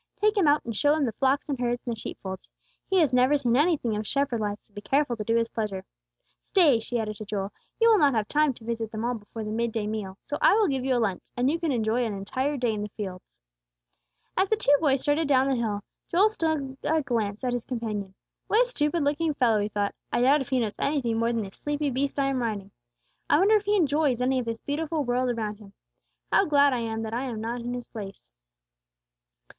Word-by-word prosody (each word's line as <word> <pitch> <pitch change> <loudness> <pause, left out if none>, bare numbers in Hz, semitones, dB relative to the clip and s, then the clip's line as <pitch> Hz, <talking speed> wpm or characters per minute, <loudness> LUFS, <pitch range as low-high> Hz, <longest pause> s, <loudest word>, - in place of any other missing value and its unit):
Take 425 +1 +3
him 385 -7 +3
out 290 +1 +3
and 230 -2 -4
show 290 +7 +3
him 305 -3 +1
the 235 - -1
flocks 265 +5 +1
and 280 -4 -3
herds, 245 0 -1
and 240 -2 -2
the - - -13
sheep - - -6
folds. 190 -1 -7 0.4
He 385 - +1
has 285 -5 +2
never 255 +4 +4
seen 245 -4 +1
anything 285 -6 +2
of 210 0 -3
shepherd 275 -4 0
life, 205 -1 -2
so 210 - -33
be 205 - -7
careful 275 +1 +1
to 215 - -4
do 225 +2 +1
his 230 0 +2
pleasure. 200 -4 -4 0.6
Stay!" 310 - +4
she 240 +2 -3
added 215 -2 -3
to 215 - -7
Joel. 200 -1 -3 0.3
"You 460 - +5
will 445 -3 +6
not 280 -4 +4
have 215 -2 0
time 300 +2 +3
to 230 - -16
visit 225 -1 -3
them 220 +1 -3
all 245 - 0
before 220 0 -7
the 215 - -4
mid 230 +1 -1
day 220 -2 -2
meal, 210 -3 -4
so 290 - -4
I - - +6
will 435 -2 +3
give 270 -4 -1
you 260 -1 +1
a - - +2
lunch, 205 -6 0 0.2
and 250 +3 +2
you 335 - -1
can 330 -3 0
enjoy 230 0 +1
an 220 -3 -2
entire 260 +9 -2
day 240 -3 0
in 210 - -3
the 210 - -4
fields." 190 -3 -8 1.0
As 380 +1 +2
the 440 - +4
two 290 -9 +4
boys 275 -4 +2
started 295 +2 +1
down 265 -1 +4
the 270 - +2
hill, 215 -4 -2 0.3
Joel 390 +5 +4
stole 310 -9 -2
a 315 0 +1
glance 220 -4 -2
at 250 -1 0
his 245 -1 -2
companion. 210 -6 -4 0.3
"What 465 +4 +4
a - - -10
stupid 300 -4 0
looking 295 +2 0
fellow!" 230 -5 +3
he 205 +1 -1
thought; 205 -1 -1 0.2
"I - - +1
doubt 275 +4 +5
if 265 - -6
he 260 - +2
knows 220 -3 -3
anything 250 -6 0
more 230 +1 +1
than 230 -2 -1
this 195 -1 -10
sleepy 295 -1 -2
beast 275 +3 -1
I 275 - +2
am 270 -2 0
riding. 205 -4 -3 0.6
I 290 - +5
wonder 400 +6 +5
if 420 -1 +1
he 415 +1 +2
enjoys 295 - +2
any 255 +1 +1
of 245 - -3
this 230 -1 -4
beautiful 310 +1 -2
world 250 0 0
around 215 -3 -3
him. 200 -2 -15 0.6
How - - +4
glad 285 -3 +4
I 250 - 0
am 225 -1 -3
that 220 0 -5
I 245 +3 -1
am 235 -4 -4
not 235 +2 -3
in 245 +1 -4
his 245 -1 -6
place." 200 -3 -8
245 Hz, 250 wpm, -26 LUFS, 220-290 Hz, 1.0 s, will